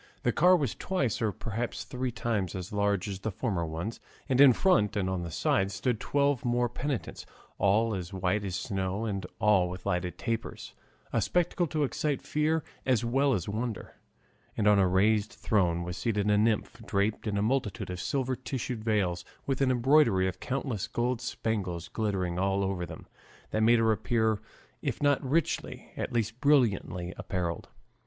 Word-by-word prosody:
The 120 Hz, -, +3 dB
car 180 Hz, +8 st, +5 dB
was 140 Hz, -9 st, 0 dB
twice 140 Hz, -, -1 dB
or, 110 Hz, -2 st, +2 dB
perhaps, 115 Hz, +4 st, -4 dB
three 125 Hz, 0 st, -3 dB
times 105 Hz, -6 st, -2 dB
as 95 Hz, +3 st, -6 dB
large 100 Hz, -2 st, +1 dB
as 95 Hz, -2 st, -4 dB
the 110 Hz, -, -2 dB
former 95 Hz, -5 st, -2 dB
ones, 85 Hz, +8 st, -4 dB, 0.3 s
and 135 Hz, -1 st, +3 dB
in 140 Hz, -2 st, +10 dB
front 170 Hz, -, +3 dB
and 100 Hz, -3 st, 0 dB
on 95 Hz, -1 st, -1 dB
the 85 Hz, -, -4 dB
sides 95 Hz, +4 st, +1 dB
stood 120 Hz, -1 st, 0 dB
twelve 140 Hz, -1 st, +1 dB
more 120 Hz, 0 st, +2 dB
penitents, 130 Hz, +1 st, -4 dB, 0.4 s
all 110 Hz, +4 st, +3 dB
as 90 Hz, -2 st, -4 dB
white 95 Hz, +2 st, 0 dB
as 95 Hz, -2 st, -3 dB
snow 95 Hz, +3 st, -2 dB
and 100 Hz, -4 st, -3 dB
all 100 Hz, -4 st, +3 dB
with 90 Hz, 0 st, -8 dB
lighted 90 Hz, -2 st, -1 dB
tapers, 115 Hz, -1 st, -4 dB, 0.4 s
a -, -, +2 dB
spectacle 175 Hz, 0 st, +1 dB
to 155 Hz, -1 st, 0 dB
excite 145 Hz, 0 st, -1 dB
fear 155 Hz, +1 st, +1 dB, 0.2 s
as 125 Hz, -3 st, +2 dB
well 135 Hz, +3 st, +2 dB
as 90 Hz, -4 st, -3 dB
wonder; 110 Hz, +1 st, -4 dB, 0.6 s
and 105 Hz, -, +2 dB
on 105 Hz, -1 st, +6 dB
a 95 Hz, -, +4 dB
raised 105 Hz, +4 st, +2 dB
throne 85 Hz, -5 st, +1 dB
was 90 Hz, 0 st, -5 dB
seated 105 Hz, +1 st, 0 dB
a -, -, +4 dB
nymph 110 Hz, -1 st, 0 dB
draped 100 Hz, +3 st, -1 dB
in 100 Hz, -1 st, -1 dB
a 100 Hz, -, +1 dB
multitude 110 Hz, -4 st, -1 dB
of 90 Hz, -, -5 dB
silver 130 Hz, -2 st, -1 dB
tissue 130 Hz, -1 st, -4 dB
veils 105 Hz, -6 st, 0 dB, 0.2 s
with 135 Hz, -1 st, -1 dB
an 135 Hz, -, +4 dB
embroidery 125 Hz, -6 st, +4 dB
of 95 Hz, 0 st, -4 dB
countless 130 Hz, -6 st, -2 dB
gold 120 Hz, 0 st, -1 dB
spangles 90 Hz, -7 st, -3 dB
glittering 95 Hz, -5 st, -1 dB
all 95 Hz, +1 st, +1 dB
over 95 Hz, -3 st, -2 dB
them, 80 Hz, 0 st, -10 dB, 0.5 s
that 110 Hz, -, 0 dB
made 115 Hz, +2 st, +6 dB
her 115 Hz, -1 st, +3 dB
appear, 110 Hz, -1 st, +1 dB, 0.4 s
if -, -, -2 dB
not 145 Hz, -1 st, +2 dB
richly, 150 Hz, +5 st, -1 dB
at -, -, -3 dB
least 115 Hz, 0 st, -1 dB
brilliantly, 105 Hz, -10 st, +2 dB
apparelled. 90 Hz, -3 st, -3 dB
110 Hz, 175 wpm, -29 LUFS, 95-125 Hz, 0.6 s, in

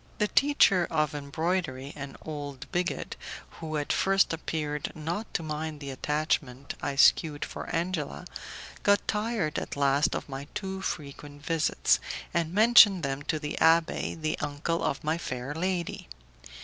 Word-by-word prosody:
The 210 Hz, -, +2 dB
teacher 220 Hz, -, +4 dB
of 155 Hz, -2 st, +1 dB
embroidery, 145 Hz, -1 st, -2 dB
an 140 Hz, -2 st, -7 dB
old 145 Hz, -4 st, -6 dB
bigot, 180 Hz, 0 st, -2 dB, 0.4 s
who 155 Hz, -2 st, -3 dB
at 145 Hz, -, 0 dB
first 195 Hz, -2 st, +3 dB
appeared 150 Hz, -2 st, -3 dB
not 170 Hz, +8 st, -4 dB
to 165 Hz, -, 0 dB
mind 155 Hz, 0 st, -4 dB
the 140 Hz, -1 st, -6 dB
attachment 140 Hz, -1 st, -1 dB
I 140 Hz, -, -2 dB
shewed 150 Hz, +1 st, +4 dB
for -, -, -7 dB
Angela, 170 Hz, -1 st, -2 dB, 0.6 s
got 205 Hz, 0 st, +3 dB
tired 210 Hz, -7 st, 0 dB
at -, -, -6 dB
last 140 Hz, +1 st, +2 dB
of -, -, -4 dB
my 140 Hz, 0 st, -6 dB
too 190 Hz, -1 st, -4 dB
frequent 145 Hz, -2 st, -6 dB
visits, 165 Hz, -2 st, +2 dB, 0.3 s
and 165 Hz, -1 st, 0 dB
mentioned 210 Hz, -3 st, +7 dB
them 135 Hz, 0 st, -2 dB
to 155 Hz, -, +2 dB
the 150 Hz, 0 st, -4 dB
abbé, 165 Hz, 0 st, +3 dB
the 155 Hz, 0 st, -1 dB
uncle 145 Hz, +3 st, -2 dB
of 140 Hz, -, -1 dB
my 155 Hz, +2 st, 0 dB
fair 130 Hz, -1 st, -4 dB
lady. 175 Hz, -, -2 dB
155 Hz, 150 wpm, -28 LUFS, 145-175 Hz, 0.6 s, mentioned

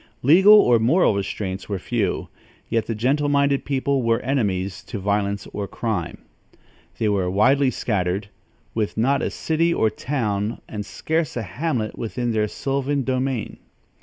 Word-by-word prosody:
Legal 190 Hz, +10 st, +8 dB
or 125 Hz, -, +5 dB
moral 130 Hz, -, +3 dB
restraints 95 Hz, -1 st, -4 dB
were 100 Hz, -, -1 dB
few; 100 Hz, 0 st, -2 dB, 0.4 s
yet 115 Hz, -1 st, 0 dB
the 115 Hz, -, -2 dB
gentle 140 Hz, +6 st, +1 dB
minded 140 Hz, -1 st, +2 dB
people 140 Hz, 0 st, 0 dB
were 115 Hz, -1 st, +2 dB
enemies 100 Hz, -8 st, -1 dB
to -, -, -6 dB
violence 100 Hz, 0 st, -1 dB
or 100 Hz, -1 st, -3 dB
crime. 100 Hz, -8 st, -3 dB, 0.8 s
They 110 Hz, -, 0 dB
were 100 Hz, -3 st, +1 dB
widely 130 Hz, +8 st, +3 dB
scattered, 100 Hz, -4 st, -1 dB, 0.5 s
with 110 Hz, -2 st, -2 dB
not 135 Hz, +5 st, +2 dB
a -, -, -1 dB
city 165 Hz, +1 st, 0 dB
or 110 Hz, -9 st, +2 dB
town 110 Hz, -4 st, -2 dB
and 105 Hz, -1 st, -5 dB
scarce 160 Hz, -4 st, -2 dB
a 115 Hz, -, -2 dB
hamlet 120 Hz, -, -3 dB
within 120 Hz, +1 st, -2 dB
their 110 Hz, -1 st, +1 dB
sylvan 140 Hz, +4 st, -1 dB
domain. 130 Hz, -2 st, -2 dB
115 Hz, 150 wpm, -22 LUFS, 105-140 Hz, 0.8 s, Legal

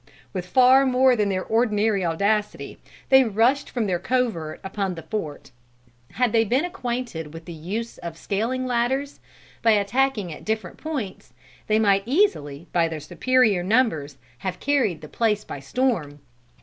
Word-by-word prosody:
With 180 Hz, -2 st, -4 dB
far 255 Hz, +5 st, +6 dB
more 260 Hz, -1 st, +4 dB
than 210 Hz, -3 st, +1 dB
their 185 Hz, -1 st, -1 dB
ordinary 215 Hz, -3 st, +1 dB
audacity, 200 Hz, +5 st, -1 dB, 0.3 s
they 265 Hz, 0 st, +7 dB
rushed 240 Hz, +5 st, +1 dB
from 235 Hz, -3 st, -1 dB
their 180 Hz, -3 st, 0 dB
covert 215 Hz, -9 st, -1 dB
upon 190 Hz, -1 st, -3 dB
the 165 Hz, -, -8 dB
fort. 160 Hz, -11 st, -5 dB, 0.6 s
Had 250 Hz, -2 st, +1 dB
they 225 Hz, 0 st, +4 dB
been 250 Hz, -, +1 dB
acquainted 240 Hz, -, -4 dB
with 165 Hz, 0 st, -9 dB
the 175 Hz, -, -8 dB
use 200 Hz, +9 st, -5 dB
of 170 Hz, -2 st, -7 dB
scaling 235 Hz, +8 st, -2 dB
ladders, 255 Hz, +3 st, -1 dB, 0.4 s
by 225 Hz, -1 st, +5 dB
attacking 210 Hz, -2 st, 0 dB
at -, -, -11 dB
different 220 Hz, 0 st, -3 dB
points, 250 Hz, -, -6 dB, 0.3 s
they 215 Hz, -, +3 dB
might 200 Hz, -3 st, +3 dB
easily, 175 Hz, -, +1 dB
by 170 Hz, -1 st, +3 dB
their 160 Hz, -1 st, -5 dB
superior 205 Hz, -, +2 dB
numbers, 175 Hz, -, +1 dB, 0.2 s
have 185 Hz, -1 st, -4 dB
carried 260 Hz, -, +1 dB
the 155 Hz, -, -9 dB
place 210 Hz, +3 st, 0 dB
by -, -, -7 dB
storm. 150 Hz, -, -1 dB
215 Hz, 155 wpm, -24 LUFS, 175-250 Hz, 0.6 s, they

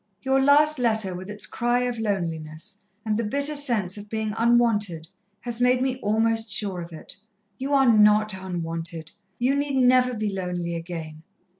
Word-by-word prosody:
Your 265 Hz, 0 st, +2 dB
last 295 Hz, +2 st, +4 dB
letter, 220 Hz, -5 st, +1 dB
with 185 Hz, +2 st, -8 dB
its 210 Hz, 0 st, -5 dB
cry 240 Hz, +1 st, 0 dB
of 245 Hz, -2 st, -2 dB
loneliness, 165 Hz, -7 st, -3 dB, 0.3 s
and 215 Hz, -1 st, 0 dB
the 230 Hz, -, -1 dB
bitter 280 Hz, +7 st, -1 dB
sense 220 Hz, -9 st, 0 dB
of 205 Hz, 0 st, -11 dB
being 220 Hz, -1 st, -2 dB
unwanted, 225 Hz, -8 st, +2 dB, 0.3 s
has 240 Hz, -1 st, -4 dB
made 250 Hz, 0 st, +4 dB
me 260 Hz, -1 st, -2 dB
almost 225 Hz, +1 st, +1 dB
sure 200 Hz, -3 st, -1 dB
of 170 Hz, 0 st, -9 dB
it. 160 Hz, +2 st, -9 dB, 0.4 s
"You 275 Hz, +2 st, 0 dB
are 270 Hz, -1 st, +4 dB
not 215 Hz, -2 st, +5 dB
unwanted 165 Hz, -3 st, -5 dB, 0.3 s
you 250 Hz, +3 st, +1 dB
need 280 Hz, 0 st, -1 dB
never 250 Hz, 0 st, +4 dB
be 215 Hz, -2 st, -2 dB
lonely 180 Hz, -2 st, -3 dB
again. 165 Hz, -2 st, -7 dB
215 Hz, 165 wpm, -24 LUFS, 180-250 Hz, 0.4 s, not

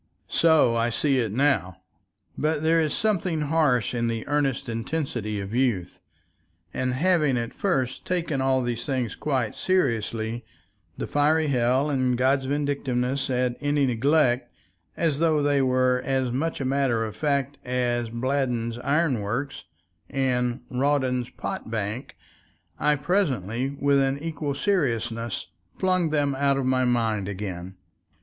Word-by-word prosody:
So 160 Hz, -6 st, +4 dB
I 115 Hz, +1 st, +1 dB
see 135 Hz, +3 st, +1 dB
it 115 Hz, -4 st, -1 dB
now, 105 Hz, -, +1 dB, 0.6 s
but 155 Hz, 0 st, 0 dB
there 165 Hz, +1 st, +4 dB
is 155 Hz, -2 st, 0 dB
something 185 Hz, -7 st, 0 dB
harsh 145 Hz, -8 st, +2 dB
in 120 Hz, -1 st, 0 dB
the 115 Hz, -1 st, -3 dB
earnest 140 Hz, -2 st, 0 dB
intensity 115 Hz, -3 st, -3 dB
of 100 Hz, +2 st, -6 dB
youth, 115 Hz, -9 st, 0 dB, 0.7 s
and 130 Hz, -1 st, -1 dB
having 155 Hz, -4 st, +2 dB
at 115 Hz, -1 st, -3 dB
first 130 Hz, -10 st, -1 dB
taken 170 Hz, -6 st, -1 dB
all 130 Hz, -1 st, +2 dB
these 120 Hz, -1 st, -2 dB
things 130 Hz, -5 st, -2 dB
quite 130 Hz, -7 st, -1 dB
seriously, 115 Hz, -, -1 dB, 0.5 s
the -, -, -3 dB
fiery 150 Hz, +1 st, +2 dB
hell 130 Hz, +3 st, +2 dB
and 130 Hz, -3 st, +1 dB
God's 130 Hz, +2 st, +2 dB
vindictiveness 140 Hz, -2 st, -1 dB
at 125 Hz, -1 st, 0 dB
any 145 Hz, -1 st, +2 dB
neglect, 125 Hz, 0 st, +2 dB, 0.5 s
as 155 Hz, -4 st, +1 dB
though 160 Hz, -3 st, +2 dB
they 145 Hz, -1 st, +3 dB
were 130 Hz, -1 st, +2 dB
as 130 Hz, -2 st, 0 dB
much 155 Hz, +6 st, -2 dB
a 135 Hz, -, -2 dB
matter 130 Hz, -4 st, +1 dB
of 110 Hz, -, -7 dB
fact 140 Hz, -2 st, -1 dB
as 120 Hz, -2 st, -1 dB
Bladden's 120 Hz, -1 st, -1 dB
iron 145 Hz, -1 st, +1 dB
works 115 Hz, +4 st, -3 dB, 0.4 s
and 125 Hz, -2 st, 0 dB
Rawdon's 130 Hz, -2 st, +1 dB
pot -, -, -5 dB
bank, 110 Hz, +2 st, -4 dB, 0.6 s
I 150 Hz, 0 st, +3 dB
presently 135 Hz, -, -1 dB
with 140 Hz, 0 st, +3 dB
an 135 Hz, 0 st, +1 dB
equal 150 Hz, -2 st, -3 dB
seriousness 120 Hz, -, -1 dB, 0.3 s
flung 185 Hz, -3 st, +1 dB
them 145 Hz, -2 st, +1 dB
out 140 Hz, 0 st, +1 dB
of 135 Hz, -, -1 dB
my 130 Hz, 0 st, +2 dB
mind 115 Hz, -5 st, +1 dB
again. 95 Hz, -2 st, -5 dB
130 Hz, 140 wpm, -25 LUFS, 120-145 Hz, 0.7 s, So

